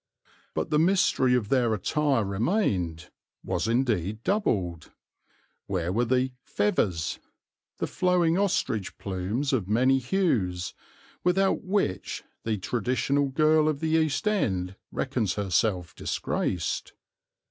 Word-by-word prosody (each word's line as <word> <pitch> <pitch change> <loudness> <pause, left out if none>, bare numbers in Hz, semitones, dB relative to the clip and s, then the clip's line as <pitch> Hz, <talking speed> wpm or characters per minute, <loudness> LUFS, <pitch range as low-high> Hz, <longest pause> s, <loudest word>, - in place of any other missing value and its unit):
But - - -2
the 150 - +4
mystery 160 -7 +3
of 110 -5 -1
their 120 -5 +3
attire 140 - +1
remained, 95 - -1 0.3
was - - -1
indeed 115 -4 0
doubled. 95 - 0 0.8
Where 90 -2 -1
were 120 +4 +2
the 130 +2 +1
"fevvers," 95 -6 0 0.6
the - - -1
flowing 180 -3 +2
ostrich 175 - 0
plumes 100 +9 -2
of 110 -8 0
many 130 +5 +3
hues, 120 - 0 0.5
without 190 +2 +2
which 190 - -1 0.2
the 110 -1 0
traditional 130 +7 0
girl 155 +2 +3
of 145 -2 -2
the 160 - -1
East 160 +4 +1
End 95 - 0 0.2
reckons 120 -8 -1
herself 95 -2 0
disgraced? 85 -3 -2
120 Hz, 115 wpm, -27 LUFS, 95-155 Hz, 0.8 s, the